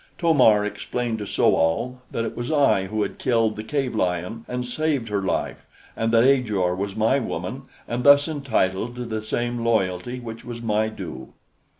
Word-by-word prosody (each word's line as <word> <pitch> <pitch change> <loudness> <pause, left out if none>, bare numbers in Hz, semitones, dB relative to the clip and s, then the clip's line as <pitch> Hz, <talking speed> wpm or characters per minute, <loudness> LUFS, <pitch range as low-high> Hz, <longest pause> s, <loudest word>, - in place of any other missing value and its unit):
To 170 -2 +3
mar 110 -7 +5
explained 115 +2 -3
to 105 - -5
So - - +3
al 120 +11 0
that 115 - -2
it - - -5
was 120 +4 -4
I 140 -11 +3
who 105 +1 -1
had - - -5
killed 115 -3 +1
the 110 - -6
cave 135 +2 -2
lion 90 +3 -2
and 125 0 -3
saved 140 -2 -1
her 100 -1 0
life, 95 - -3 0.3
and 115 0 0
that 115 0 +5
Ajor 105 -9 +2
was 100 +1 -4
my 115 +5 +2
woman 115 +4 -5 0.2
and 120 +1 -2
thus 145 +2 +7
entitled 120 -7 -1
to 125 0 -5
the 110 -2 -3
same 120 +2 -2
loyalty 110 +1 0
which 115 -2 -8
was 120 -1 -7
my 110 -1 +1
due. 90 -11 -8
115 Hz, 190 wpm, -23 LUFS, 105-125 Hz, 0.3 s, thus